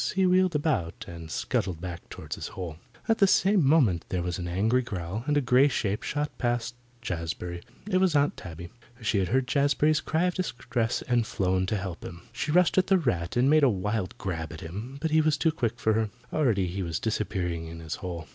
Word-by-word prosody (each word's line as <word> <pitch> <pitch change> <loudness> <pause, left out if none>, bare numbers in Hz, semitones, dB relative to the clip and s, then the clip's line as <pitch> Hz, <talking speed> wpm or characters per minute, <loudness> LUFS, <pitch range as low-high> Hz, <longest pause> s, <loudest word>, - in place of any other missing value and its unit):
He 190 0 +3
wheeled 185 -2 +3
about 145 - -1
and 85 -2 -8
scuttled 85 +1 -1
back 85 0 -7
toward - - -7
his - - -5
hole. 85 -5 -6 0.3
At 225 - +2
the 200 - +6
same 195 -1 +4
moment 135 - +4
there 90 -2 -1
was 90 +1 -2
an 90 - -4
angry 110 +8 +2
growl, 100 -2 -4
and 145 0 +2
a - - +4
grey 125 +2 +5
shape 105 -7 -1
shot 150 +1 -2
past 120 -1 0 0.3
Jazbury. 85 -2 -4 0.3
It 190 -3 +2
was 185 -4 +3
Aunt 145 0 +3
Tabby. 85 -1 -9 0.3
She 105 -2 +2
had 95 - +1
heard 130 +7 +2
Jazbury's 145 +4 +2
cry 160 +2 0
of 180 0 +2
distress 120 -9 -2
and 120 -1 +2
had 115 - -1
flown 95 -1 0
to 105 - 0
help 95 -3 -5
him. 85 0 -8
She 155 - -2
rushed 180 +3 +4
at 185 - +1
the 195 - +5
rat 90 - -1
and 125 +2 +4
made 155 +2 +5
a 140 - +6
wild 105 -1 -2
grab 80 -4 -4
at 80 - -8
him. 105 +11 -7
But 160 +1 -1
he 155 0 +5
was 155 -1 +2
too 160 - +2
quick 120 -6 -2
for 110 -1 +2
her. 110 0 +1 0.2
Already 115 -11 +2
he 90 +2 -3
was 85 -3 -2
disappearing 90 -7 -2
in 80 0 -8
his 80 -1 -5
hole. 85 -4 -6
110 Hz, 220 wpm, -27 LUFS, 90-145 Hz, 0.3 s, the